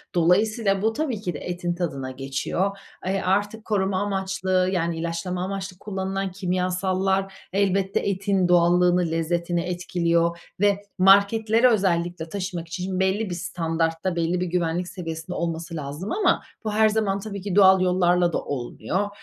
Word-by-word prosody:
Dolayısıyla 195 +3 +2
bu 220 +1 +1
tabii 265 -8 -2
ki 180 -4 -3
de 145 - -6
etin 175 -1 -3
tadına 140 -7 -3
geçiyor. 135 +9 -2 0.3
E, 195 +1 0
artık 205 +4 0
koruma 195 -3 0
amaçlı, 190 -2 0
yani 170 -3 -1
ilaçlama 170 +2 -3
amaçlı 190 -1 -5
kullanılan 195 -1 -3
kimyasallar 185 +1 0 0.2
elbette 195 0 +1
etin 195 -1 0
doğallığını, 175 0 +4
lezzetini 170 +1 0
etkiliyor 170 -1 0 0.2
ve 200 0 +3 0.2
marketlere 215 +5 +5
özellikle 175 -6 0
taşımak 185 -3 -4
için 185 +2 -3
belli 190 +2 +1
bir 175 - -3
standartta, 165 0 -1
belli 170 +1 0
bir - - +1
güvenlik 175 0 -1
seviyesinde 165 -1 -6
olması 165 0 -3
lazım. 150 +6 -5
Ama 420 - +2 0.2
bu 215 - -2
her 220 0 +4
zaman 210 -2 0
tabii 200 -1 -6
ki 195 -1 -3
doğal 190 -2 +7
yollarla 180 -1 +3
da - - +1
olmuyor. 145 +9 -3
185 Hz, 145 wpm, -24 LUFS, 170-195 Hz, 0.3 s, doğal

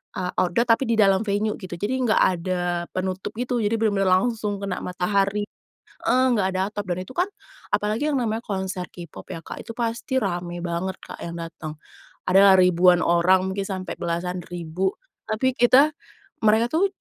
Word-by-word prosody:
eee, 180 -1 -2
outdoor 210 +7 +1
tapi 230 +3 +4
di 230 - +1
dalam 195 +1 +4
venue 210 +1 0
gitu, 185 -4 -8
jadi 215 +6 0
enggak 240 -4 +2
ada 175 -1 0
penutup 185 0 -3
gitu. 250 0 -1
Jadi, 210 +2 +1
bener-bener 200 -3 +2
langsung 205 0 +1
kena 195 -2 -3
matahari 200 +3 0 0.6
heeh, 255 +1 +4
enggak 205 -5 +2
ada 185 - 0
atap, 205 - -4
dan 185 - -5
itu 220 - -11
kan 360 - +3 0.5
apalagi 220 +9 0
yang 270 - +2
namanya 225 0 -2
konser 190 -2 -3
K-pop 170 -3 -10
ya 165 - -6
Kak, - - -8
itu 230 - -7
pasti 235 +3 -2
rame 175 -2 -3
banget 175 +2 -2
Kak - - -9
yang 170 - -5
datang. 165 -2 -7 0.5
Adalah 195 +1 +7
ribuan 180 0 +5
orang, 185 +2 +3
mungkin 195 0 -2
sampai 185 -2 -5
belasan 175 +1 -2
ribu. 175 +2 -2 0.3
Tapi 230 +4 +1
kita 260 +5 +6 0.6
mereka 220 +3 +4
tuh 340 +5 +3
195 Hz, 175 wpm, -24 LUFS, 180-220 Hz, 0.6 s, Adalah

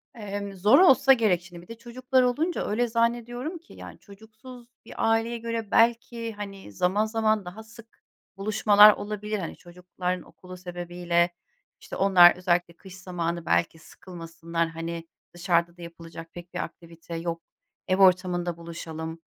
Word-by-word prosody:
emm, 200 -2 -6
zor 205 - +4
olsa 275 -6 +6
gerek 215 -8 +2
şimdi, 175 -1 -12
bir 175 - -18
de 230 - -10
çocuklar 255 +2 0
olunca 300 +8 0
öyle 235 +4 0
zannediyorum 240 +6 -1
ki 335 +1 -18
yani - - -11
çocuksuz 220 +4 -14 0.2
bir - - -11
aileye 225 +1 +1
göre 230 -2 -5
belki, 230 0 +1
hani, 200 - -9
zaman 185 - +1
zaman 220 -2 0
daha 190 +5 -9
sık 225 +1 -17 0.3
buluşmalar 210 0 +6
olabilir, 210 0 -5
hani, 170 - -6
çocukların 180 +1 -5
okulu 185 0 -13
sebebiyle. 175 -1 -1 0.5
İşte, - - -9
onlar, 185 -3 +6
özellikle 175 -1 0
kış 190 +1 -13
zamanı, 170 -2 -4
belki 85 - 0
sıkılmasınlar, 165 0 -5
hani, 165 0 -6 0.3
dışarıda 170 -1 0
da 175 - -13
yapılacak 165 -1 -11
pek 175 0 -11
bir - - -4
aktivite 170 0 -10
yok, 165 0 -4 0.5
ev 185 - +1
ortamında 180 -2 +2
buluşalım 165 -1 -7
190 Hz, 145 wpm, -26 LUFS, 170-225 Hz, 0.5 s, olsa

